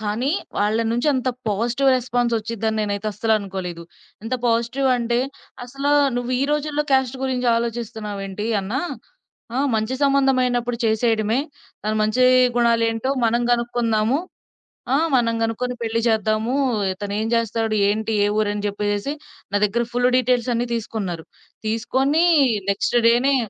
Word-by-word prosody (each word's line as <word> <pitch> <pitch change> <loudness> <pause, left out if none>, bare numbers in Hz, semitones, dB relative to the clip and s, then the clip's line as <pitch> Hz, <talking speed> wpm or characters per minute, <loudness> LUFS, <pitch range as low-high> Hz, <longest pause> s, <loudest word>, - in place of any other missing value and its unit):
కానీ 220 +6 -1 0.3
వాళ్ళ 210 +2 +1
నుంచి 240 +5 -1
అంత 255 -1 -1 0.2
పాజిటివ్ 240 +6 +1
రెస్పాన్స్ 245 -1 -1
ఒచ్చిద్ది 225 0 -4
అని 220 - -1
నేనైతే 205 0 -2
అస్సలు 220 +2 -1
అనుకోలేదు. 185 -4 -6 0.4
ఎంత 235 +3 -2
పాజిటివ్ 235 +4 +1
అంటే 235 0 0 0.5
అసలు 275 +3 -2 0.3
"నువ్వు 245 +1 -2
ఈ - - +2
రోజుల్లో 300 0 0
క్యాస్ట్ 265 -1 +2
గురించి 255 -2 -1
ఆలోచిస్తున్నావేంటి 215 -3 -4
అన్నా? 220 +9 -2 0.8
ఆహ్, 280 +1 +1
మంచి 220 +4 -1
సంబంధం 275 -1 +3
అయినప్పుడు 245 -1 -1
చేసేయడమే. 220 0 +1 0.5
తన 215 - 0
మంచి 215 +4 +2 0.3
గుణాలు 235 -1 +3
ఏంటో 225 +4 -2 0.2
మనం 235 +1 +1
గనుక్కుందాము. 235 +1 +1 0.8
ఆ! - - +5 0.2
మనం 230 -2 +2
గనుక్కొని 250 +2 -2
పెళ్ళి 230 0 -1
చేద్దాము." 220 +3 0 0.4
ఇతనేం 205 +2 -3
జేస్తాడు? 225 -1 0
ఏంటి? 220 +1 -1
ఏ - - +2
ఊరు? 210 -1 +1
అని 205 - -4
జెప్పేసేసి 205 +5 -2 0.4
నా - - +4
దగ్గర 235 +4 0
ఫుల్లు 245 +1 +2
డీటెయిల్స్ 250 -1 +1
అన్ని 240 +1 -1
తీసుకున్నారు. 200 -7 -4 0.4
తీసుకొని 265 +8 +1 0.5
నెక్స్ట్ 220 +4 0
డే‌నే 255 +4 +4
230 Hz, 140 wpm, -22 LUFS, 215-250 Hz, 0.8 s, ఆ